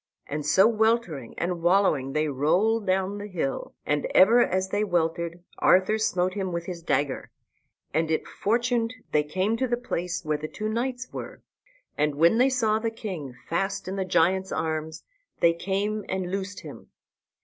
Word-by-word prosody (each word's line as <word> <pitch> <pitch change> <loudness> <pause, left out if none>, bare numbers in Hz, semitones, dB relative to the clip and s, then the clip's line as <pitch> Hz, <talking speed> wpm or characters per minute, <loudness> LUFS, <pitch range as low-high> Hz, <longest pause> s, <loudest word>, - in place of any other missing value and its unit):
And 150 +1 -4
so 170 +8 +5
weltering 220 - 0
and 175 -1 -2
wallowing 170 -7 +2
they 155 0 +1
rolled 190 +11 +1
down 190 +2 0
the 205 - -6
hill, 165 -9 -3
and 145 0 0
ever 230 +6 +7
as 190 +1 -1
they 205 +2 0
weltered 170 -2 -1 0.2
Arthur 190 +4 +4
smote 185 -4 +1
him 190 -2 -3
with 170 0 -3
his 175 -2 -6
dagger; 140 -4 -1 0.6
and 160 +1 +1
it 160 - 0
fortuned 235 +2 0 0.2
they 150 - +4
came 185 +9 -1
to 260 - 0
the 240 0 0
place 180 -8 -3
where 155 -1 0
the 155 - -4
two 215 +6 -4
knights 250 +3 -3
were. - - -7 0.6
And 150 -1 +1
when 170 +9 +4
they 260 +2 +5
saw 220 -4 +1
the 225 0 -1
king 180 - -6
fast 195 +4 -2
in 190 - -3
the 195 - -1
giant's 185 +1 +2
arms 160 0 -3 0.4
they 170 0 +5
came 200 +4 -2
and 185 -1 -2
loosed 195 +1 -4
him. - - -11
185 Hz, 170 wpm, -26 LUFS, 160-215 Hz, 0.6 s, ever